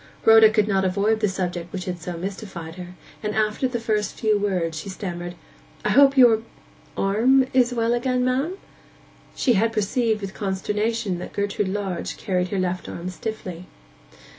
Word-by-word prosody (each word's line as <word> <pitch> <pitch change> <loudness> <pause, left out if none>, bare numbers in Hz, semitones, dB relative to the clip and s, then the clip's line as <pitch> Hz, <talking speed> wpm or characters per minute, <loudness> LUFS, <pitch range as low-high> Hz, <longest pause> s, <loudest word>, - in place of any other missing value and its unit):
Rhoda 225 -1 +8
could 215 -1 +2
not 195 -2 +1
avoid 200 +4 +1
the 210 -2 +1
subject 175 -2 -3
which 185 -2 -5
had 180 -1 -4
so 175 +1 -5
mystified 185 -3 -6
her, 180 0 -9 0.3
and 210 -1 -3
after 215 +4 +1
the 245 -2 -3
first 215 -3 -1
few 215 -1 +2
words 180 -5 -1
she 195 - -7
stammered, 175 -2 -5 0.5
'I - - +2
hope 275 0 +5
your—arm 230 +1 +2
is 250 -1 +4
well 230 -1 +1
again, 250 +1 0
ma'am?' 275 +9 0 0.8
She 245 - +2
had 225 +2 +2
perceived 220 +1 0
with 195 -1 -5
consternation 210 0 -2
that - - -8
Gertrude 200 0 -1
Lodge 195 -2 -3
carried 180 -3 -1
her 195 - -3
left 185 -1 -2
arm 175 +2 -5
stiffly. 185 -4 -6
205 Hz, 165 wpm, -23 LUFS, 185-225 Hz, 0.8 s, Rhoda